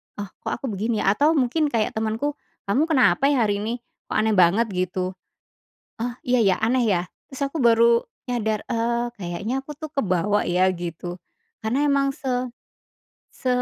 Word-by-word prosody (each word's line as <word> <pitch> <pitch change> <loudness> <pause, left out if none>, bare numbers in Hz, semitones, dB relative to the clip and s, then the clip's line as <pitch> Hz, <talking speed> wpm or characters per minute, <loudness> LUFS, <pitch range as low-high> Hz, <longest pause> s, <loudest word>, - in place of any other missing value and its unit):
"Oh, 205 -2 -6
kok - - -4
aku 270 - -7
begini 215 +2 -1
ya?" 195 - +4
Atau 300 +8 +3
mungkin 295 +3 +2
kayak 225 -6 0
temanku, 225 +7 -2 0.2
"Kamu 255 +11 +1
kenapa 265 - +4
ya, 270 -5 +3
hari 205 -1 0
ini, 220 +3 -2 0.3
kok - - -4
aneh 220 0 +2
banget?" 195 +4 +4
Gitu, 185 0 -1 0.9
"Oh, 240 +1 -2
iya 250 0 +2
ya, 195 -4 +4
aneh 245 +2 +3
ya?" 180 -4 +2 0.3
Terus 270 0 -10
aku 320 - -3
baru 235 -1 +5 0.3
nyadar, 220 -3 -1
eee, 235 +1 0 0.2
kayaknya 180 +7 -3
aku 295 +2 -9
tuh 310 +1 -8
kebawa 205 -4 +1
ya, 185 +2 +3
gitu. 175 0 -6 0.4
Karena 245 +7 0
emang 275 -1 +2
se 255 -1 -2 0.9
se 255 - -5
230 Hz, 165 wpm, -23 LUFS, 195-260 Hz, 0.9 s, baru